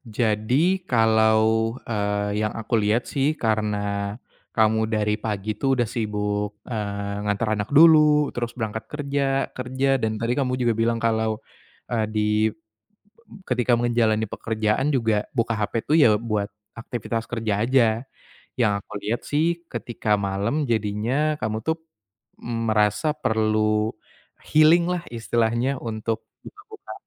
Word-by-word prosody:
jadi 120 - +1
kalau, 110 0 +3
eee, 105 -1 -1
yang 110 0 -1
aku 115 +1 -4
lihat 105 +4 +1
sih 145 +3 0
karena 105 -3 -1 0.4
kamu 110 0 +3
dari 105 -1 0
pagi 105 -1 -2
itu 135 +2 +1
udah 120 - +2
sibuk, 105 -2 -2
eee, 100 -3 -4
nganter 105 +2 0
anak 105 0 -3
dulu 150 -1 +6
terus 120 0 -4
berangkat 110 -1 -4
kerja, 140 -2 -1
kerja 130 +1 0
dan 110 -1 -1
tadi 115 +1 0
kamu 130 -2 0
juga 120 -2 +2
bilang 115 +1 +1
kalau, 110 -1 0 0.6
eee, 110 -2 +1
di 105 -1 0 0.2
be 110 - -11 0.9
ketika 125 -1 +2
menjalani 115 -2 +2
pekerjaan 110 +4 -1
juga 110 -4 +1
buka 115 -2 0
HP 110 +2 -1
itu - - -1
ya 110 -5 +6
buat 105 -3 -2 0.3
aktivitas 115 -1 -4
kerja 110 -4 -1
aja. 130 0 +4 0.7
Yang 115 -4 +3
aku - - -26
lihat 110 +4 -2
sih 150 +2 +2 0.2
ketika 110 -3 -2
malam 100 +9 -1
jadinya 115 +8 0
kamu 110 0 -1
tuh, 160 0 0 0.6
mmm, 115 -1 -3
merasa 110 +8 +2
perlu 110 0 +1 0.6
healing 155 +3 +6
lah 180 -1 -2
istilahnya 115 +3 0
untuk 110 -1 -3 0.2
buka-buka 420 +1 -11
110 Hz, 135 wpm, -24 LUFS, 105-125 Hz, 0.9 s, dulu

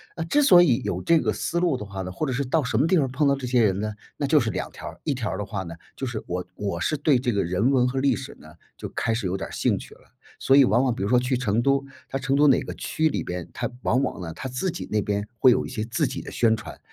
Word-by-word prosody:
那 165 - -3
之 290 - +2
所 180 -9 +8
以 130 -9 +3
有 - - -2
这 165 -1 +4
个 - - 0
思 170 - -2
路 175 -5 +2
的 105 - -6
话 100 -1 -6
呢， 90 - -6
或 95 +12 -3
者 130 - -1
是 140 +3 -1
到 150 +4 +1
什 125 - -1
么 160 - +3
地 185 - +3
方 135 -5 +1
碰 140 +3 +1
到 140 - +3
这 135 -2 -6
些 125 -1 +3
人 95 -2 +1
呢？ 105 +1 -2 0.3
那 145 - -1
就 150 +2 +5
是 120 -4 -1
2 95 - -4
条 - - -9
儿， - - -9
一 150 - 0
条 115 -8 -3
儿 95 - -3
的 105 - -3
话 95 -2 -4
呢， 85 -2 -8 0.2
就 135 - -3
是 120 -3 -5
我 90 +1 -3
我 100 -4 -3
是 155 - 0
对 145 -2 +3
这 125 -1 0
个 100 - +1
人 95 +8 +1
文 125 -2 +3
和 130 +1 -1
历 140 +1 +2
史 130 +1 -7
呢， 80 +1 -14 0.2
就 - - -6
开 115 - -1
始 110 -2 -2
有 90 +1 -1
点 - - -5
儿 - - -12
兴 - - +1
趣 - - -12
了。 - - -22 0.4
所 135 - +4
以 140 - +8
往 120 +3 +3
往 125 - +1
比 - - -3
如 100 - -1
说 125 - +5
去 125 +1 0
成 115 -2 0
都， 140 +2 +2 0.2
它 135 - -2
成 135 +1 0
都 145 +1 +5
哪 135 - +5
个 - - -6
区 160 0 0
里 - - -2
边， 90 -1 -5
它 - - -3
往 130 +4 +2
往 95 - -3
呢， 80 -2 -6
它 130 - -6
自 130 +10 -2
己 - - -6
那 105 -1 +2
边 100 +1 -2
会 130 - +7
有 - - +1
一 - - -7
些 110 - -3
自 120 +3 0
己 - - -5
的 - - -9
宣 115 -2 +3
传， 105 - -10
125 Hz, 340 characters per minute, -24 LUFS, 105-140 Hz, 0.4 s, 所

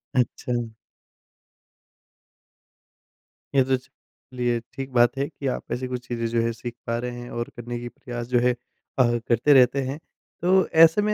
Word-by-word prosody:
अच्छा। 120 -1 -1 2.8
ये 135 - +6
तो 130 +1 +2
ज - - -4 0.5
चलिए 120 -1 0
ठीक 135 -1 -6
बात 120 +1 +4
है 140 +1 0
कि 145 -3 -6
आप - - -5
ऐसी 125 +1 -2
कुछ 125 -1 -5
चीज़ें 120 -2 -2
जो 115 0 +1
है 115 0 +1
सीख 120 +1 -6
पा 115 - 0
रहे 125 0 -3
हैं 120 0 -8
और 120 - -3
करने 120 0 -5
की 120 0 -6
प्रयास 120 -1 -7
जो 125 0 +3
है 125 +1 +3
अ, 120 +2 -3 0.2
करते 120 +5 +4
रहते 130 +1 +5
हैं। 140 - -3 0.4
तो 185 +2 +4 0.2
ऐसे 165 +6 +2
में 210 +1 +1
125 Hz, 175 wpm, -25 LUFS, 120-135 Hz, 2.8 s, ये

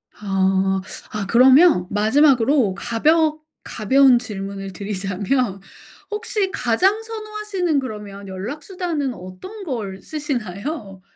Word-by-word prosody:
아. 190 -1 +1 0.3
아 210 -2 -3
그러면 255 - +6
마지막으로 245 0 +3
가벼 310 - +2 0.2
가벼운 260 +3 +4
질문을 195 -4 -6
드리자면 200 +3 -2 0.5
혹시 420 -2 -2
가장 385 - +1
선호하시는 425 -7 -2
그러면 210 -5 -7
연락 200 +11 -6
수단은 335 -8 -3
어떤 185 - -10
걸 210 - -4
쓰시나요? 240 - -5
240 Hz, 250 characters per minute, -21 LUFS, 195-315 Hz, 0.5 s, 그러면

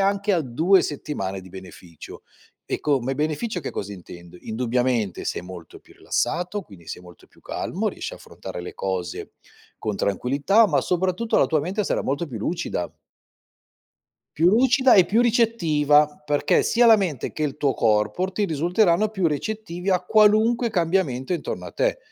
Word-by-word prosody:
anche 200 +1 +1
a 165 - +1
2 160 +10 +3
settimane 95 -10 -4
di 95 - -14
beneficio. 90 -3 -12 0.5
E, - - -1
co 145 -3 +1
ma 130 +3 -2
beneficio, 155 - -2
che - - -5
cosa 100 +1 -5
intendo? 85 -1 -12
Indubbiamente, 120 -2 -1
sei - - -2
molto 90 -2 -11
più - - -21
rilassato, 180 +4 -2
quindi 95 - -16
sei - - -7
molto 90 -1 -16
più - - -25
calmo, - - -3
riesci - - -6
a - - -8
affrontare - - -9
le 90 - -8
cose 95 -3 -4 0.5
con 105 -2 -3
tranquillità, 140 - +2
ma, 155 -8 +1
soprattutto, 185 +5 0
la - - +4
tua 155 -2 +1
mente 190 +8 -2
sarà - - -1
molto 145 +5 -2
più 130 -6 -7
lucida. 105 - -3 1.4
Più 165 - +3
lucida 255 +4 +4
e 190 - +7
più 220 +6 +2
ricettiva, 165 -12 +3 0.2
perché 145 -1 +2
sia 240 +1 +3
la 225 -1 +8
mente 175 - -3
che 155 - -4
il 150 -2 -2
tuo 140 -3 0
corpo 105 - +1
ti 205 +2 -1
risulteranno 175 +4 +2
più 190 -4 -1
ricettivi 180 +3 -3
a 185 -2 +2
qualunque 220 +4 +3
cambiamento 165 -7 0
intorno 175 - -4
a - - -10
te, - - 0
155 Hz, 170 wpm, -23 LUFS, -, 1.4 s, la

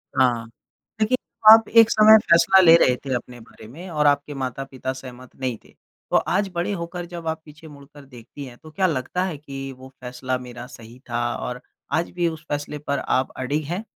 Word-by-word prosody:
हाँ, 120 -3 +2 0.6
लेकिन 255 +4 +2 0.3
आप 225 0 +7
एक 230 0 +6
समय 215 0 +7
फैसला 180 +3 +6
ले 165 -2 +8
रहे 125 -5 +3
थे 130 - -2
अपने 120 0 -7
बारे 110 -1 -15
में 170 +10 -10
और 150 -2 0
आपके 145 +1 +1
माता-पिता 130 0 -5
सहमत 130 -1 -12
नहीं 125 -4 -3
थे। - - -21 0.4
तो - - +4
आज 195 +2 0
बड़े 175 +4 -1
होकर, 170 0 -5
जब 170 -2 -8
आप 160 0 -3
पीछे 155 +1 -14
मुड़कर 145 -1 -15
देखतीं 125 +2 -11
हैं, 120 -1 -12
तो 155 -1 -15
क्या 190 +2 +1
लगता 160 +5 -2
है 165 -6 -4
कि 135 -2 -8
वो 130 0 -13
फैसला 125 +1 -4
मेरा 120 -1 -9
सही 120 -1 -14
था? 120 0 -1
और 125 0 -6 0.3
आज 165 +2 0
भी 175 -1 -1
उस 160 0 -6
फैसले 145 0 -4
पर 140 0 0
आप 130 +1 0
अडिग 145 +4 -2
हैं? 180 +8 -4
140 Hz, 200 wpm, -22 LUFS, 125-170 Hz, 0.6 s, ले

